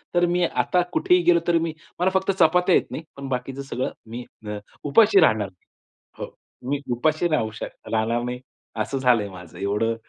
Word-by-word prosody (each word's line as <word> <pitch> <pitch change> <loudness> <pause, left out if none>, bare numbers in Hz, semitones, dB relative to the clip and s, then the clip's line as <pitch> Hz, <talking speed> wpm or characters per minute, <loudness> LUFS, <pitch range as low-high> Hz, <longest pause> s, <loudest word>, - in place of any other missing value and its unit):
तर 175 0 +4
मी 175 +1 +1
आता 180 +2 +1
कुठेही 180 0 +3
गेलो 170 0 +5
तर 170 -1 +4
मी 165 -1 -2 0.3
मला 185 +2 +3
फक्त 190 +1 +2
चपात्या 180 +3 +4
येत - - +1
नाही. 160 - -5
पण 140 -1 -6
बाकीचं 130 +2 -3
सगळं 130 -2 -3 0.2
मी 120 +1 -5 0.2
अ, 105 0 -3 0.3
उपाशी 200 +8 +5
राहणार 110 - +3
नाही. 90 - -33 0.6
हो, - - -17 0.3
मी 145 -1 0 0.2
उपाशी 155 +6 +1
राहू 115 -9 0
शक - - -3 0.2
राहणार 115 +2 +1
नाही. 125 0 -4 0.4
असं 135 +6 -2
झालंय 120 -6 +2
माझं. 90 -2 -12
एवढं 105 +4 0
135 Hz, 185 wpm, -24 LUFS, 115-175 Hz, 0.6 s, गेलो